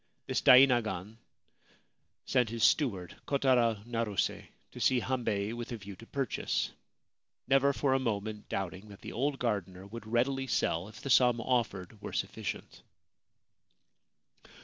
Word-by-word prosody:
This - - -1
dainagon 115 -6 +5 1.1
sent 125 -4 +2
his 115 -1 -3
steward, 100 - +2
Kotaro 120 -6 +2
Naruse, 115 -4 -2 0.2
to - - -10
see 130 - +3
Hambei 115 -5 -1
with 120 +1 -6
a 120 - -3
view 100 -1 -10
to 115 - -13
purchase, 135 -4 -1 0.8
never 135 +1 +4
for 140 -1 +1
a 135 - +3
moment 110 -3 -3
doubting 95 +2 -4
that 100 - -13
the - - -7
old 135 +4 0
gardener 95 -6 -2
would 110 +2 -9
readily 135 +4 0
sell 85 -6 0
if 105 0 -12
the 140 - -3
sum 125 -1 +5
offered 110 -5 -2
were - - -7
sufficient. - - -4
115 Hz, 135 wpm, -31 LUFS, 105-130 Hz, 1.1 s, dainagon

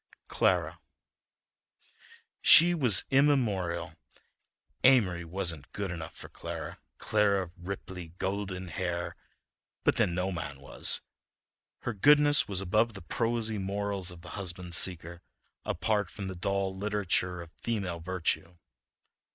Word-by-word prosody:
CLARA - - +1 1.6
She 175 +1 +9
was 125 - +4
immemorial.... 115 -12 +1 0.9
Amory 105 -10 +4
wasn't 85 -4 -3
good 100 -3 -3
enough 80 -2 -7
for - - -9
Clara, - - -7 0.2
Clara 100 -2 +1
of 85 - -11
ripply 90 -1 -7
golden 95 -2 -3
hair, 85 -1 -3 0.7
but - - +2
then 85 - +1
no 90 +2 -1
man 70 -6 -6
was. 70 - +1 0.8
Her 120 - -3
goodness 145 +7 +5
was 95 -2 +1
above 110 +4 +1
the 95 - -9
prosy 115 +1 -1
morals 100 -1 -3
of 90 -2 -9
the 90 - -11
husband 90 -3 -5
seeker, 85 -1 0 0.4
apart 105 -4 -1
from 100 0 -7
the 95 - -6
dull 95 +1 -2
literature 95 -3 -1
of 85 -1 -10
female 95 -6 -4
virtue. 85 -1 -2
95 Hz, 120 wpm, -29 LUFS, 85-105 Hz, 1.6 s, She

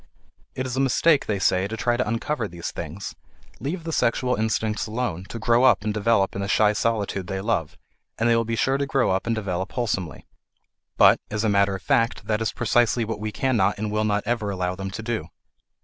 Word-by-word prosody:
It 130 - -2
is 130 -1 -3
a - - -1
mistake, 135 +3 +3
they 105 - 0
say, 95 0 +2
to 110 +2 -5
try 120 +2 +1
to 125 - -1
uncover 115 +1 -1
these 85 -2 -6
things; 85 +4 -6 0.5
leave 165 +5 -4
the 165 - -4
sexual 125 0 +1
instincts 110 0 -1
alone, 110 -6 -3
to 115 - -7
grow 115 +2 +3
up 120 -6 +5
and 105 0 -1
develop 105 -2 +2
in 100 - -3
the 100 - -2
shy 105 0 +3
solitude 100 -3 -1
they 95 0 -3
love, 95 -7 -1 0.4
and 115 - +1
they 115 - +4
will 115 - +2
be 115 0 -2
sure 135 +4 +1
to 140 - -1
grow 135 -6 +2
up 95 +4 -1
and 115 - +1
develop 95 -3 -3
wholesomely. 100 - -3 0.7
But, - - +6
as 105 +1 -2
a 110 - +2
matter 100 -1 +3
of 95 - -8
fact, 115 0 +1
that 110 0 0
is 110 - 0
precisely 120 0 +2
what 110 -1 -4
we 110 0 -3
can 130 +5 0
not 95 - +2
and 105 0 -3
will 105 0 0
not 105 -1 0
ever 115 -2 -1
allow 90 -2 -2
them 95 +1 -5
to 110 +4 -6
do. 110 -9 -3
110 Hz, 225 wpm, -24 LUFS, 100-120 Hz, 0.7 s, But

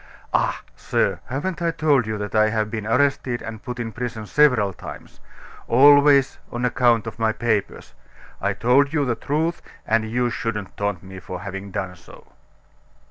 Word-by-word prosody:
"Ah! - - +1
sir, - - 0
haven't 165 +8 -3
I 170 - +1
told 150 -7 +2
you 110 -1 -2
that 105 -1 -5
I 110 0 +4
have 110 -1 -1
been 110 -2 -4
arrested 125 0 +1
and 110 -1 -7
put 125 -3 -6
in 115 -2 -3
prison 115 -1 -5
several 125 -7 +3
times - - -11 0.5
always 140 +1 +6
on 120 +1 -2
account 120 -2 +2
of 115 - -7
my 110 -1 +2
papers? 110 -3 -2 0.5
I 100 +1 0
told 135 +7 +3
you 145 -3 +1
the 125 - +1
truth, 160 +7 -2 0.2
and 110 0 +1
you 120 +1 0
shouldn't 105 -5 -4
taunt 100 -3 -2
me 95 0 -9
for 90 0 -7
having 100 0 -6
done 95 -2 -4
so." - - -17
115 Hz, 170 wpm, -22 LUFS, 105-135 Hz, 0.5 s, always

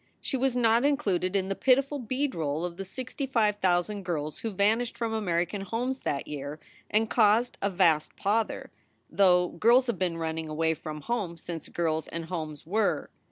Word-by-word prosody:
She - - -3
was 260 -1 +1
not 230 0 +4
included 200 -11 +1
in 190 -1 +1
the 195 - 0
pitiful 275 +4 +2
beadroll 215 - -1
of 175 -1 -6
the 195 - -5
sixty 260 +6 -5
five 215 -5 +2
thousand 190 +2 +1
girls 155 -5 -3
who 225 - -3
vanished 215 +4 +1
from 230 -1 -2
American 180 -2 -1
homes 245 +7 -2
that 140 - -2
year 145 +1 -6 0.3
and 220 +1 +2
caused 225 +2 +3
a 200 - +1
vast 170 -5 +2
pother, 215 +3 -1 0.4
though 180 -2 +4
girls 235 +8 +4
have 235 -7 -2
been 175 -3 0
running 160 -1 -3
away 160 +1 +1
from 155 -1 -7
home 205 -7 -2
since 165 -1 -7
girls 160 -2 -1
and 165 0 -5
homes 155 -4 -5
were. 205 +5 0
195 Hz, 175 wpm, -28 LUFS, 165-230 Hz, 0.4 s, not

